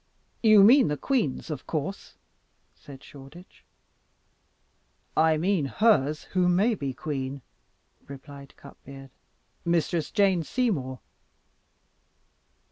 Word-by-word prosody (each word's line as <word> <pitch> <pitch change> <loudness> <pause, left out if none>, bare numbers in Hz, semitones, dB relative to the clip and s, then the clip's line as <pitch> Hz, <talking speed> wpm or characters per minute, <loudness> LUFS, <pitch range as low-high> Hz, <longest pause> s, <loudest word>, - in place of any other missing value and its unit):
"You 215 -3 +6
mean 250 +5 +6
the 150 - -2
queen's, 170 - -2
of 145 -4 -7
course?" 160 +5 -5 0.6
said 135 -2 -14
Shoreditch. 145 +6 -15 1.5
"I 160 0 +3
mean 175 -1 0
hers 155 -4 +1
who 180 -1 0
may 200 +7 +2
be 140 -9 -4
queen," 135 -1 -5 0.6
replied 140 0 -12
Cutbeard; 135 -1 -14 0.5
"Mistress 170 -2 -1
Jane 195 -4 +2
Seymour." 155 - -2
155 Hz, 95 wpm, -26 LUFS, 140-195 Hz, 1.5 s, You